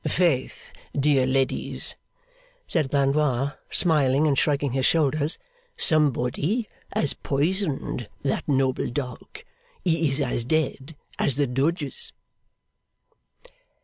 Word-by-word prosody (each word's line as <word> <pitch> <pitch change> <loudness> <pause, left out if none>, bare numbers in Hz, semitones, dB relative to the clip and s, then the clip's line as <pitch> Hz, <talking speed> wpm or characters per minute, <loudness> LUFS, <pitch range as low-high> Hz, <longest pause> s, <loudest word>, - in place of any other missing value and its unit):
'Faith, 165 -8 0 0.3
dear 135 -2 +3
ladies!' 135 0 -1 0.7
said 155 -6 0
Blandois, 140 -1 +2 0.2
smiling 150 -4 +3
and 145 -3 +3
shrugging 140 -1 +1
his 130 +1 0
shoulders, 155 +1 +2 0.4
'somebody 155 - +2 0.2
has 145 - +1
poisoned 145 - -1
that 135 - -1
noble 135 -2 +1
dog. 125 -1 -6 0.4
He 165 -3 +2
is 135 +2 -1
as 125 -4 0
dead 145 +1 -1 0.2
as 135 - +1
the 145 +1 +2
Doges! 140 +4 -2
140 Hz, 100 wpm, -25 LUFS, 135-155 Hz, 0.7 s, dear